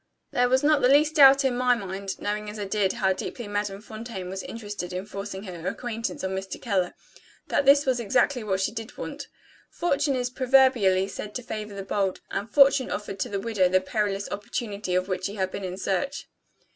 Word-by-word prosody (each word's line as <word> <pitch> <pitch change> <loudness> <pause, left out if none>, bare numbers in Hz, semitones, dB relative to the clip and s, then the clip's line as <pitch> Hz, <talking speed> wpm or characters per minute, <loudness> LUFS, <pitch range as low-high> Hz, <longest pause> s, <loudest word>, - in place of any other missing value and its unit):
There 245 0 +2
was 260 +2 +3
not 300 -1 +4
the 250 - +4
least 300 +3 +4
doubt 275 -1 +8
in 255 -2 +2
my 250 0 +3
mind 195 -2 -5
(knowing 210 +1 -3
as 210 - -7
I 205 - -3
did, 195 -1 +1
how 195 -5 +1
deeply 225 +4 -6
Madame 205 -1 -3
Fontaine 215 -4 -7
was 190 0 -4
interested 205 -5 -6
in 185 +2 -4
forcing 200 -1 -6
her 180 -3 -7
acquaintance 230 -2 -4
on 190 - -1
Mr. 190 0 -4
Keller) 195 -7 -1 0.5
that 275 - +1
this 280 +1 +7
was 255 -2 +1
exactly 245 +3 +1
what 190 -2 -1
she 200 - 0
did 225 -1 -7
want. - - -6 0.4
Fortune 285 -4 0
is 250 -1 -1
proverbially 255 -8 +4
said 205 +1 -7
to 250 - -4
favor 215 -3 -6
the 195 - -5
bold; 195 -1 -1
and 205 +3 -3
Fortune 275 +2 +5
offered 200 -2 -5
to - - -1
the 200 - -2
widow 200 -4 +1
the 185 +1 +4
perilous 200 +1 -1
opportunity 205 -2 -3
of 185 0 +1
which 185 -1 -2
she 205 - -3
had 190 -2 -1
been 200 - -5
in 185 0 -4
search. 195 +9 -2
210 Hz, 210 wpm, -26 LUFS, 190-245 Hz, 0.5 s, doubt